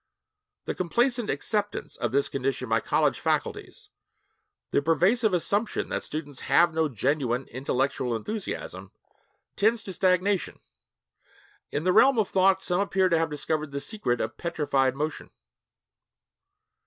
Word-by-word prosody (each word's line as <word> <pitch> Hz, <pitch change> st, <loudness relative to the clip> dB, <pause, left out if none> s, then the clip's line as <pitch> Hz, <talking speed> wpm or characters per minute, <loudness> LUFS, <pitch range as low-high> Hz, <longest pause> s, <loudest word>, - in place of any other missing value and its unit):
The -, -, -2 dB
complacent 240 Hz, +6 st, 0 dB
acceptance 210 Hz, -2 st, -2 dB
of 120 Hz, -, -2 dB
this 140 Hz, +2 st, +2 dB
condition 135 Hz, -1 st, -2 dB
by 115 Hz, 0 st, +2 dB
college -, -, +1 dB
faculties -, -, -3 dB, 0.8 s
the -, -, +2 dB
pervasive 185 Hz, -, +3 dB
assumption 200 Hz, +5 st, 0 dB
that -, -, -2 dB
students 145 Hz, -3 st, -6 dB
have 170 Hz, -1 st, +3 dB
no 160 Hz, -1 st, +1 dB
genuine 130 Hz, +1 st, -1 dB
intellectual 130 Hz, -1 st, -1 dB
enthusiasm 110 Hz, -, -5 dB, 0.6 s
tends 225 Hz, +2 st, +2 dB
to 190 Hz, -, -6 dB
stagnation. 185 Hz, +1 st, +1 dB, 1.1 s
In 145 Hz, -, -2 dB
the 185 Hz, +1 st, +2 dB
realm 270 Hz, +4 st, +6 dB
of 215 Hz, -3 st, +1 dB
thought 190 Hz, 0 st, +3 dB
some 180 Hz, +1 st, +1 dB
appear 190 Hz, -2 st, +2 dB
to 165 Hz, -2 st, +3 dB
have 165 Hz, -, 0 dB
discovered 155 Hz, +1 st, -2 dB
the 140 Hz, 0 st, -4 dB
secret 140 Hz, -, -2 dB
of 110 Hz, +1 st, -4 dB
petrified 140 Hz, -6 st, 0 dB
motion. 150 Hz, +2 st, -4 dB
160 Hz, 130 wpm, -26 LUFS, 135-195 Hz, 1.1 s, realm